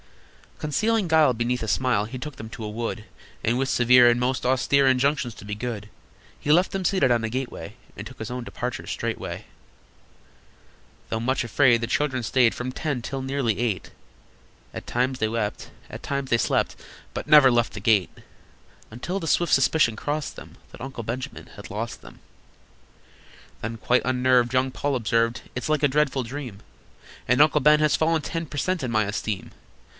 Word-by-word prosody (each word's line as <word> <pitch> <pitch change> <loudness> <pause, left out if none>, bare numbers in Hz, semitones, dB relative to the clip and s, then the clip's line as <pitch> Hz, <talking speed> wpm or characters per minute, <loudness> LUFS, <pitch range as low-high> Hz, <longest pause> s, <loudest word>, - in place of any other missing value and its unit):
Concealing 215 +7 0
guile 155 -5 +4
beneath 120 +1 -1
a - - -4
smile, 115 -2 +1
He 125 +4 -7
took 150 +2 -7
them 110 -4 -9
to 115 - -8
a 105 - -4
wood, 110 0 -4 0.4
And, 115 +2 +1
with 135 0 0
severe 125 0 +6
and 120 0 +2
most 130 +1 -1
austere 135 +2 +3
Injunctions 130 0 +2
to - - -12
be 105 0 -4
good, 105 -2 -5 0.5
He 145 - 0
left 180 +4 +4
them 190 -1 -3
seated 175 -11 +2
on 120 -1 +2
a 115 - -1
gateway, 120 -6 -5 0.2
And 100 - -7
took 130 +2 -11
his 110 - -5
own 125 0 -4
departure 125 +1 -5
straightway. - - -4 1.6
Though 110 - -1
much 130 +3 0
afraid, 120 0 +3
the 115 - -2
children 130 0 0
stayed 120 -1 +3
From 125 +1 -4
ten 145 -2 -3
till 135 +3 -5
nearly 130 -6 -1
eight; 115 -6 -1 0.8
At - - -8
times 125 +2 0
they 110 - 0
wept, 110 -2 -3 0.2
at - - -9
times 140 -1 -3
they 120 - +3
slept, - - 0 0.4
But - - -4
never 150 -3 +8
left 120 -1 +1
the - - -6
gate: 100 -3 +2 0.8
Until 175 - -4
the 165 - -5
swift 170 0 +2
suspicion 135 -2 +3
crossed 145 +6 -3
them - - -12
That - - -12
Uncle 130 -2 -6
Benjamin 120 +4 -5
had - - -10
lost - - -5
them. - - -14 1.4
Then, 115 +1 -4
quite 125 +3 +2
unnerved, 125 -1 +2
young 130 0 +2
Paul 140 +1 -2
observed: 115 0 +1
"It's 125 - -3
like 155 -1 +1
a - - +6
dreadful 140 -1 +1
dream, 125 -4 -7 0.7
And 125 +4 +4
Uncle 150 0 +4
Ben 150 +2 +6
has 150 -1 +3
fallen 160 0 +1
ten 165 +3 -4
Per 145 - -8
cent. 185 +4 0
in 125 - -2
my 110 -2 +2
esteem. 105 -1 -4
125 Hz, 185 wpm, -24 LUFS, 115-145 Hz, 1.6 s, never